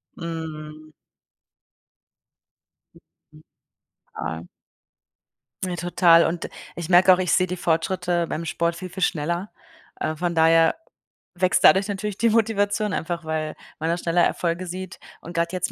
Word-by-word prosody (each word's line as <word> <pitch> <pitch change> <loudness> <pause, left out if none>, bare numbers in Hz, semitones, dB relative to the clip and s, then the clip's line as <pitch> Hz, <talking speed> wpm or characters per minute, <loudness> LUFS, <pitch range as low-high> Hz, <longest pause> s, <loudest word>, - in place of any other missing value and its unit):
Mhm. 155 -2 -7 2.0
Mhm. 155 0 -22 0.7
Klar. 80 +1 -5 1.2
Ja, 180 -1 -3
total 175 -1 +4
und 170 0 -3 0.3
ich 170 -2 -5
merke 185 +1 +6
auch, - - +2
ich 180 -1 -1
sehe 185 0 +3
die 180 +1 -4
Fortschritte 175 +1 0
beim 165 +1 -4
Sport 170 +1 -1
viel, 185 +1 -7
viel 190 +2 -8
schneller. 170 +4 -1 0.5
Äh, 155 - -2
von 170 +1 -2
daher 165 0 +4 0.6
wächst 180 +1 +1
dadurch 195 +1 +6
natürlich 205 0 -4
die 230 - +3
Motivation 210 -2 +1
einfach, 170 0 -3
weil 155 -1 -3 0.2
man 160 +1 -1
da 170 - +1
schneller 175 0 +1
Erfolge 175 +1 -1
sieht 185 +1 -7 0.2
und 170 - -10
grad 170 0 0
jetzt 185 0 -2
175 Hz, 135 wpm, -23 LUFS, 165-185 Hz, 2.0 s, merke